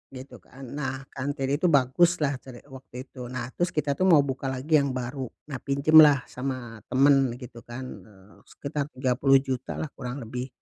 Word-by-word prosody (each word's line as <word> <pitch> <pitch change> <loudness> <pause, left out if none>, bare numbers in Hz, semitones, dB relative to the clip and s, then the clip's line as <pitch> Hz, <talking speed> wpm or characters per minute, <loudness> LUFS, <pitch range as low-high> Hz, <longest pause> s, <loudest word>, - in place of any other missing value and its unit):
gitu 130 +1 -10
kan. 135 +1 -15
Nah, 135 -2 -4
kantin 135 0 -3
itu 180 - +2
baguslah 145 0 +2
cere 125 -3 -13
waktu 130 -1 -9
itu. 125 -2 -10
Nah 125 0 -5
terus 175 +5 -1
kita 150 -2 0
tuh 185 - +3
mau 155 -6 +6
buka 135 0 -4
lagi 135 +4 +2
yang 140 -2 -1
baru. 125 +1 -4 0.2
Nah 130 - -4
pinjemlah 145 0 +6
sama 125 -3 -5
teman, 135 -2 +3
gitu 125 -2 -11
kan, 120 +2 -7 0.2
eee, 100 -1 -19
sekitar 140 0 -4
Rp30.000.000-lah 135 +2 +1
kurang 125 +1 -6
lebih, 125 +3 -5
135 Hz, 165 wpm, -26 LUFS, 125-140 Hz, 0.2 s, mau